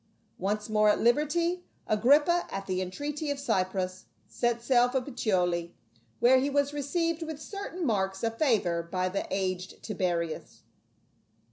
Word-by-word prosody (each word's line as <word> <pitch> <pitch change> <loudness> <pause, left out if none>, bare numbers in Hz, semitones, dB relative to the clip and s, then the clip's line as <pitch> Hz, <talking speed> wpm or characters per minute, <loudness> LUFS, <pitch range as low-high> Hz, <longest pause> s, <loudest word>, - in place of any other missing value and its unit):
Once 210 +3 -1
more 215 -1 +3
at 210 - +3
liberty, 335 +8 +2 0.2
Agrippa, 290 +11 +4
at 195 0 -5
the 185 -1 -1
entreaty 290 - -4
of 285 - -1
Cypros, 185 -7 -1 0.2
set 240 -1 0
sail 245 -1 +4
for 265 +1 +1
Puteoli, 180 -10 -1 0.4
where 255 +3 +6
he 275 +2 0
was 285 0 +1
received 330 +3 -1
with 320 -2 -5
certain 370 +1 -5
marks 195 -4 0
of 225 0 -2
favor 205 - +2
by 185 +2 -2
the 195 +2 -3
aged 185 -1 -3
Tiberius. 175 -6 -3
230 Hz, 140 wpm, -29 LUFS, 185-290 Hz, 0.4 s, where